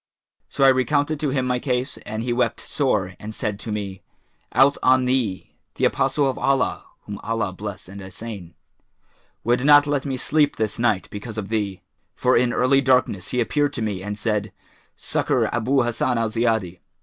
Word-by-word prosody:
So - - -1
I 135 - +8
recounted 145 +4 +1
to 150 -1 0
him 130 -1 0
my 125 -1 0
case 125 0 -2
and 110 +1 -3
he 120 0 -1
wept 120 -1 0
sore 105 -10 -1
and 110 +1 -7
said 105 -5 -3
to 110 - -6
me, 100 -3 -4 0.5
'Out 135 +2 +4
on 130 0 +4
thee! 125 -8 -1 0.2
The - - +1
Apostle 145 -2 +2
of 130 - -2
Allah 135 -2 +1 0.2
(whom 100 -1 -7
Allah 110 -4 -2
bless 100 -1 -7
and 100 +2 -9
assain!) 95 -2 -8 0.9
would 120 +2 +1
not 145 0 +7
let 145 -2 0
me 135 -2 -3
sleep 145 +3 +2
this 110 0 -2
night, 110 -5 +1
because 105 +2 -7
of 100 -2 -4
thee; 105 -4 -2 0.3
for 125 - +2
in 120 0 +3
early 130 +3 +3
darkness[FN#421] 125 -8 +1
he 125 - 0
appeared 145 +4 0
to 115 - -3
me 100 -4 -2
and 105 +1 -5
said, 105 -2 -1 0.4
'Succour - - 0
Abu 125 +3 +2
Hassan 120 +1 0
al 115 -1 0
Ziyadi.' 110 -6 0
120 Hz, 185 wpm, -23 LUFS, 105-130 Hz, 0.9 s, I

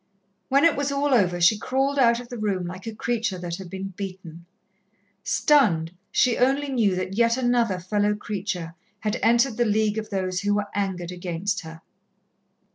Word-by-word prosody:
When 275 +1 +4
it 335 -2 +5
was 285 0 -1
all 280 0 +1
over, 180 -7 +2
she 175 +5 +4
crawled 270 +4 0
out 235 -2 +4
of 245 -1 -10
the 245 - -6
room 195 -4 -1
like 185 +4 -8
a 225 - -5
creature 225 -3 -1
that 175 -1 -5
had 190 -2 -9
been 190 +2 -5
beaten. 185 -3 -8 0.8
Stunned, 185 - +3 0.2
she 250 -3 +2
only 275 +3 +2
knew 225 -8 +2
that 185 +1 -3
yet 230 +3 +2
another 240 -6 +1
fellow 205 +3 0
creature 190 -5 -4 0.3
had 210 -1 -1
entered 235 +2 +3
the 240 - +3
league 215 0 +1
of 215 - -7
those 185 -2 -2
who 205 0 +1
were 205 0 -2
angered 185 -3 -2
against 180 +2 -3
her. 160 -1 -10
205 Hz, 180 wpm, -24 LUFS, 185-240 Hz, 0.8 s, it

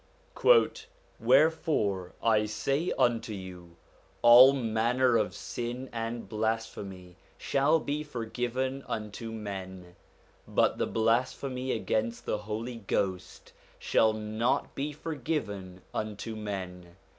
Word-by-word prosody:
'Wherefore 130 - +2
I 110 -2 +3
say 135 +10 -1
unto 115 -2 +1
you, 90 -3 -9 0.5
All 120 +3 +10
manner 120 0 +1
of 105 -4 +1
sin 120 +4 -5
and 115 0 -4
blasphemy 105 -5 -4 0.2
shall 145 +4 +2
be 150 0 -2
forgiven 130 0 -3
unto 110 +1 -5
men: 95 -4 -7 0.5
but - - +2
the - - +1
blasphemy 125 +3 0
against 115 +1 -1
the 105 - -1
Holy 110 +3 -5
Ghost 95 -3 -3 0.2
shall 110 -1 +3
not 110 +2 -1
be 145 +2 -3
forgiven 120 - -4
unto 110 +1 -4
men. 90 -4 -6
115 Hz, 100 wpm, -29 LUFS, 105-125 Hz, 0.5 s, All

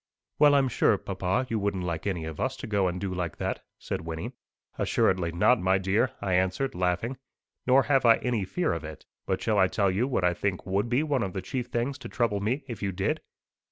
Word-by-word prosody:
"Well, 145 -1 +7
I'm 135 -1 +4
sure, 115 -3 +3
papa, 95 +6 -1
you 115 -3 -1
wouldn't 100 -2 -1
like 85 +1 -3
any 90 -5 -2
of 80 -2 -7
us - - -1
to - - -6
go 100 -3 +1
and 90 0 -2
do 95 -1 -3
like 90 -3 -3
that," - - -3
said 95 - -4
Wynnie. 80 +8 -5 0.5
"Assuredly 90 -3 +2
not, 90 +8 +3
my 95 +1 +3
dear," 95 +6 +1
I 95 -2 -1
answered, 95 +9 +1
laughing. 90 +8 -1 0.5
"Nor 130 +1 +6
have 135 -2 +2
I 115 -1 +7
any 120 -5 -1
fear 135 - -1
of 85 -1 -4
it. 75 0 -9 0.2
But 95 - -1
shall 110 -3 +2
I 95 - +5
tell 100 0 +1
you 110 +7 +1
what 125 -9 0
I 90 0 +3
think 90 +1 -2
would 100 +5 0
be 125 +5 +2
one 145 -5 0
of 95 -3 -2
the 95 - -3
chief 125 +5 -3
things 125 +3 -2
to - - -8
trouble 115 -5 0
me 120 +8 -1
if 115 -6 -6
you 100 -1 -1
did?" 95 +1 -1
100 Hz, 230 wpm, -27 LUFS, 90-120 Hz, 0.5 s, Well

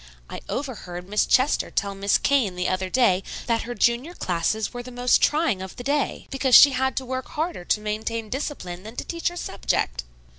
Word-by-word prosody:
I - - -6
overheard 190 -10 -5
Miss 210 +2 +1
Chester 260 +3 +2
tell 200 -1 -1
Miss 195 +1 +2
Kane 255 -10 +1
the 180 0 -1
other 185 0 -1
day 195 -6 +3 0.2
that 230 -1 +1
her 245 - -4
junior 245 +11 +1
classes 185 +6 -1
were 245 - -5
the 250 - -10
most 245 0 +2
trying 295 - +2
of 190 -1 -7
the 245 - -8
day, 285 +2 -1
because 270 -2 +3
she 285 - +10
had 265 0 -1
to 265 - -1
work 260 0 -4
harder 315 - -3
to 210 - +1
maintain 215 +1 -3
discipline 210 - -5
than 220 +4 -10
to - - -4
teach 335 -1 -3
her 350 - -2
subject." - - -2
240 Hz, 200 wpm, -24 LUFS, 195-265 Hz, 0.2 s, she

